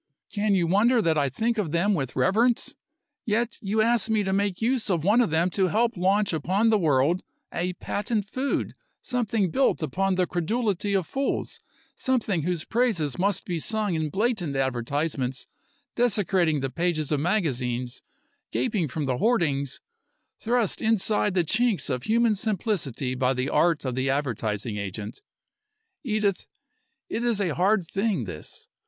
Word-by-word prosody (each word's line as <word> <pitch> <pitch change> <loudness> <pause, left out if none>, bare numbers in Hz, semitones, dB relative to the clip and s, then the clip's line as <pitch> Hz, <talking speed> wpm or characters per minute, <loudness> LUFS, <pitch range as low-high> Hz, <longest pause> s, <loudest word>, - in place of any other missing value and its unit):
Can 205 -1 +1
you 180 -3 +2
wonder 215 +8 +3
that 165 -7 +2
I 145 -2 +1
think 225 - -1
of 175 -8 -1
them 180 +5 +2
with 135 -8 -2
reverence? 220 - +2 0.5
Yet 230 +2 -1
you 215 +1 +1
ask 230 -2 +2
me 215 -2 +2
to 190 -1 -1
make 200 -1 0
use 235 -1 +1
of 170 -5 +1
one 210 +7 +4
of 235 - +1
them 165 +3 +1
to 190 0 +2
help 230 +6 +1
launch 195 +2 +2
upon 190 +8 +1
the 215 - +4
world 155 +1 +2 0.3
a 180 +1 -1
patent 205 +3 -2
food, 260 +6 -2 0.3
something 225 -7 0
built 265 -8 +2
upon 195 +4 0
the 180 0 +2
credulity 200 +3 -1
of 190 -3 +1
fools, 275 +8 -2 0.4
something 220 -9 0
whose 170 0 -2
praises 195 - 0
must 195 0 +1
be 175 -2 -2
sung 215 +2 -1
in 160 -2 -1
blatant 195 - -1
advertisements, 135 +1 -1 0.5
desecrating 190 - +1
the 135 -1 -2
pages 165 -3 0
of 150 - +2
magazines, 130 - -1 0.5
gaping 210 -10 0
from 145 +2 -3
the 130 -2 -1
hoardings, 145 - 0 0.6
thrust 235 -3 0
inside 215 -2 +1
the 180 - +3
chinks 215 +4 +1
of 125 -1 -3
human 230 0 +3
simplicity 190 - -2
by 130 0 +1
the 125 +1 -1
art 165 -4 +2
of 130 - -1
the 130 +2 -1
advertising 115 -6 -1
agent. 100 - -6 0.8
Edith, 215 -6 0 0.6
it 230 - -3
is 235 -4 +1
a 180 -6 0
hard 190 +2 +2
thing, 195 - -1
this. 85 -7 -9
185 Hz, 160 wpm, -26 LUFS, 150-220 Hz, 0.8 s, one